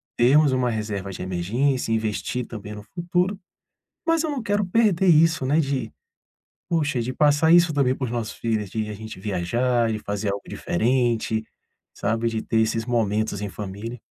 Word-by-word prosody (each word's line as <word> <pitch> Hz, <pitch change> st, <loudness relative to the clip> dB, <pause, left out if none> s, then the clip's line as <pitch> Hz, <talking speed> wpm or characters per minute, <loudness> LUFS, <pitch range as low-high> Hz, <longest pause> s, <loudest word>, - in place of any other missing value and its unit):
termos 140 Hz, +4 st, +5 dB
uma 130 Hz, -1 st, +1 dB
reserva 105 Hz, -3 st, -3 dB
de -, -, -7 dB
emergência, 115 Hz, +9 st, 0 dB
investir 110 Hz, +2 st, -1 dB
também 105 Hz, -2 st, -8 dB
no 105 Hz, -, -9 dB
futuro. 180 Hz, -, -1 dB, 0.7 s
Mas 330 Hz, -1 st, +2 dB
eu 315 Hz, -, -1 dB
não 275 Hz, -, -3 dB
quero 205 Hz, -1 st, +1 dB
perder 190 Hz, -2 st, +2 dB
isso, 160 Hz, -3 st, +4 dB
né, 145 Hz, +5 st, +3 dB
de, 135 Hz, -6 st, -1 dB, 0.8 s
poxa, 150 Hz, -6 st, 0 dB
de 125 Hz, +2 st, -2 dB
passar 150 Hz, +4 st, +4 dB
isso 175 Hz, -1 st, +6 dB
também 135 Hz, -3 st, +2 dB
para 130 Hz, -, -4 dB
os -, -, -5 dB
nossos 115 Hz, -3 st, -3 dB
filhos, 110 Hz, -4 st, -2 dB
de 110 Hz, 0 st, -2 dB
a 105 Hz, -, -5 dB
gente 110 Hz, -2 st, -9 dB
viajar, 115 Hz, +5 st, 0 dB
de 110 Hz, -, -2 dB
fazer 100 Hz, -1 st, -2 dB
algo 100 Hz, 0 st, -5 dB
diferente, 115 Hz, +1 st, 0 dB, 0.5 s
sabe? 115 Hz, +2 st, 0 dB
De 110 Hz, -1 st, -2 dB
ter 110 Hz, -, +1 dB
esses 110 Hz, 0 st, 0 dB
momentos 110 Hz, -3 st, 0 dB
em 105 Hz, -, -2 dB
família. 105 Hz, +4 st, -6 dB
120 Hz, 175 wpm, -24 LUFS, 105-145 Hz, 0.8 s, isso